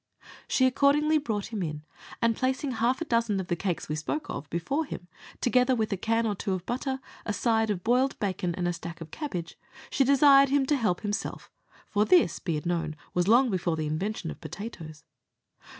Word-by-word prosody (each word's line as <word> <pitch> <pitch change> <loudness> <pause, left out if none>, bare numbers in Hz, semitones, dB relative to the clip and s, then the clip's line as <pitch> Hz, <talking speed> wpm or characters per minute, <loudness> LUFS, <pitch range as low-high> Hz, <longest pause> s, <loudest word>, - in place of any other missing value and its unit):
She 260 - +3
accordingly 290 +4 +3
brought 220 -5 -3
him 210 - -2
in, 150 -3 -4 0.4
and 230 -1 +3
placing 260 +3 -1
half 245 +4 0
a - - -1
dozen 230 -6 +1
of 190 - -5
the 175 - +1
cakes 175 0 -3
we 150 - -2
spoke 225 - -3
of 140 - -6
before 175 - -1
him, 175 - -8 0.3
together 250 +1 +3
with 220 -3 0
a - - +1
can 225 +4 0
or 215 - +1
two 195 0 -2
of 185 -1 -4
butter, 265 +2 -2 0.2
a - - -2
side 225 0 +1
of 185 -4 -2
boiled 255 +3 +2
bacon, 185 -4 -2
and 180 -1 -1
a 175 - 0
stack 170 0 -7
of 165 -1 -9
cabbage, 185 - -5 0.3
she 275 - +3
desired 275 0 +6
him 275 0 +3
to 295 - +2
help 215 -9 0
himself 205 0 -4 0.4
for 210 -1 +2
this, 325 - +4
be 165 -4 -2
it 150 - -6
known, 170 -3 -1 0.2
was 175 0 +1
long 240 +3 +5
before 175 -3 0
the 155 -1 -2
invention 165 +3 -2
of - - -11
potatoes. 160 -8 -8
215 Hz, 205 wpm, -28 LUFS, 175-260 Hz, 0.4 s, desired